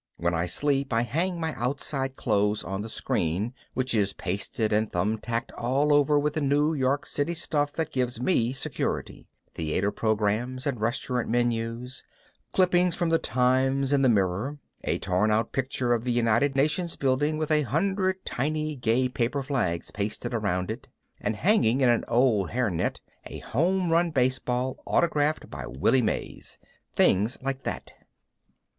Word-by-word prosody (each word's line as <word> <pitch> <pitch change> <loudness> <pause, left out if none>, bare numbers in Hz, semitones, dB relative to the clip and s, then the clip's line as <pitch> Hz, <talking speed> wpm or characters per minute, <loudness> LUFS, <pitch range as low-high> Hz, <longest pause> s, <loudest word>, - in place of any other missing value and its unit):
When 85 +1 0
I 85 +1 0
sleep 140 - 0
I 115 +1 +3
hang 170 +8 -1
my 160 -1 -2
outside 135 +1 -2
clothes 105 -2 +1
on 95 +3 -4
the 110 - -6
screen, 95 +5 -1 0.2
which 130 -1 -1
is 100 -3 +1
pasted 100 +5 -2
and 110 +1 +1
thumbtacked 110 +5 -1
all 140 +5 +1
over 145 0 +4
with 145 +1 +1
the 155 - -1
New 145 +3 +2
York 135 0 0
City 155 +4 -1
stuff 145 -3 -1
that 160 -1 -2
gives 125 -4 -1
me 125 -4 +2
security: 130 - -4 0.3
theater 85 +6 -1
programs 110 +5 -1
and 130 -6 -2
restaurant 120 +1 -1
menus, 120 +1 -1 0.5
clippings 180 -1 +3
from 175 -2 0
the 165 0 +3
Times 130 +3 +2
and 140 -1 +3
the 130 - +5
Mirror, 105 +6 +1 0.3
a - - +1
torn 95 +4 +1
out 110 +1 +1
picture 130 -2 0
of 115 -1 0
the 125 - -1
United 120 +4 +2
Nations 155 +5 +1
building 145 +3 +1
with 155 0 -2
a 155 -1 +4
hundred 190 +6 0
tiny 155 +3 -1
gay 125 0 +1
paper 125 +2 -1
flags 120 - -1
pasted 105 +4 -3
around 95 -5 -1
it, - - -7 0.3
and 105 +1 -1
hanging 140 - +3
in 130 - +5
an 120 - +2
old 115 -6 +3
hairnet 115 -8 -1 0.3
a - - -7
home 175 +6 0
run 170 +1 +3
baseball 130 -2 0
autographed 155 -2 +1
by 70 -2 -6
Willie 70 - +2
Mays. 110 - -3 0.4
Things 105 +7 +3
like 135 0 -2
that. - - -4
125 Hz, 160 wpm, -27 LUFS, 110-145 Hz, 0.5 s, the